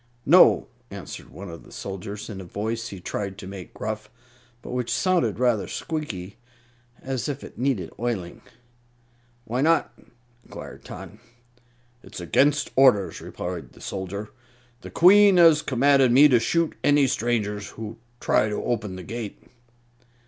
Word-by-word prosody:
"No!" - - +6 0.2
answered - - -9
one 100 - -9
of 85 - -10
the - - -17
soldiers, 100 +2 -7
in 100 -4 -7
a - - -8
voice 110 +5 -4
he 100 - -8
tried 100 +2 -4
to 100 - -9
make 95 -1 -9
gruff, 110 -1 -5 0.5
but - - -8
which 125 -1 -2
sounded 175 - +1
rather 120 -4 +1
squeaky, 110 - -5 0.7
as 130 +1 -3
if 145 -1 -5
it - - -11
needed 125 -7 -1
oiling. 110 -8 -3 1.0
"Why 120 +3 -2
not?" 165 +3 +2 0.5
inquired - - -10
Tot. - - -9 0.9
"It's 100 -2 -10
against 140 - +2
orders," 125 -8 +4
replied 85 -8 -6
the - - -17
soldier. 100 +2 -5 0.5
"The - - -9
Queen 195 +2 +6
has 165 -3 +7
commanded 135 -1 +3
me 140 +5 +8
to 125 -3 +5
shoot 165 +6 0
any 145 -1 +4
stranger 110 -4 -1
who 110 +2 -8 0.2
tries 110 - +2
to 105 - -3
open 105 -5 -2
the 90 - -8
gate." 110 +2 -6
115 Hz, 145 wpm, -24 LUFS, 100-135 Hz, 1.0 s, me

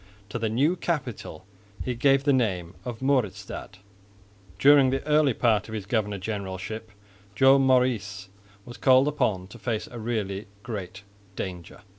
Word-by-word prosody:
To 120 - -4
the 110 -1 0
new 140 +10 +2
capital 140 - -4 0.4
he 125 - -1
gave 135 +3 +3
the 140 0 +3
name 95 -9 0
of 120 0 -6
Mauritsstad. 105 -7 -1 0.8
During 140 +4 +6
the 135 +1 -2
earlier 150 -4 +3
part 110 -4 +2
of 110 - -5
his 105 -3 -5
governor 105 -1 -1
generalship 100 +2 -5 0.5
Joan 135 +4 +6
Maurice 110 -7 +1 0.4
was 120 - -10
called 130 +1 +5
upon 105 -10 0
to 120 - -12
face 110 +1 -2
a 120 - -7
really 110 -3 -3 0.2
great 105 -4 -6 0.3
danger. 90 -3 -6
115 Hz, 145 wpm, -26 LUFS, 100-130 Hz, 0.8 s, During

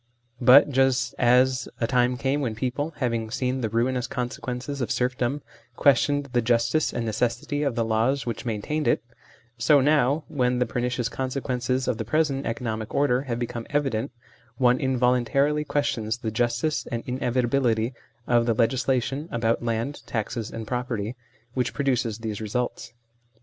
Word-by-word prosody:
But 130 +4 +7
just 130 -2 +2
as 125 +1 +3
a 115 - +1
time 125 +1 +2
came 140 +2 0
when 115 -5 -2
people, 135 +7 -3
having 115 -4 -1
seen 130 +1 -1
the 110 - -1
ruinous 120 +2 0
consequences 125 +2 -4
of 120 - -1
serfdom, 125 +2 -1 0.3
questioned 145 +1 +3
the 120 - +3
justice 115 +5 +2
and 120 - -3
necessity 120 +6 -1
of 140 -5 0
the 115 - 0
laws 115 +5 +1
which 115 -2 -4
main 110 -4 -3
tained 150 -2 -1
it, 115 - +2 0.6
so 140 +6 +5
now, 145 +1 +3
when 125 -3 0
the 125 - +2
pernicious 120 0 -1
conse 130 +3 -3
quences 130 0 -1
of 125 -3 -1
the - - -1
present 140 +3 0
economic 110 -2 -3
order 130 -3 +3
have 120 - -1
become 120 -1 -4
evident, 135 -4 0 0.5
one 125 0 +4
involuntarily 130 +3 +2
questions 125 -7 -1
the 115 -3 -4
justice 120 +6 0
and 115 0 -4
inevitability 125 -1 0 0.3
of 120 -1 +2
the 115 - +2
legislation 130 +5 0
about 115 0 0
land, 120 +4 -2
taxes, 110 0 -3
and 115 -1 -6
property, 120 -1 -3 0.4
which 125 -2 -1
produces 125 -6 0
these 110 -2 -5
results. 115 +2 -3
125 Hz, 155 wpm, -25 LUFS, 115-135 Hz, 0.6 s, But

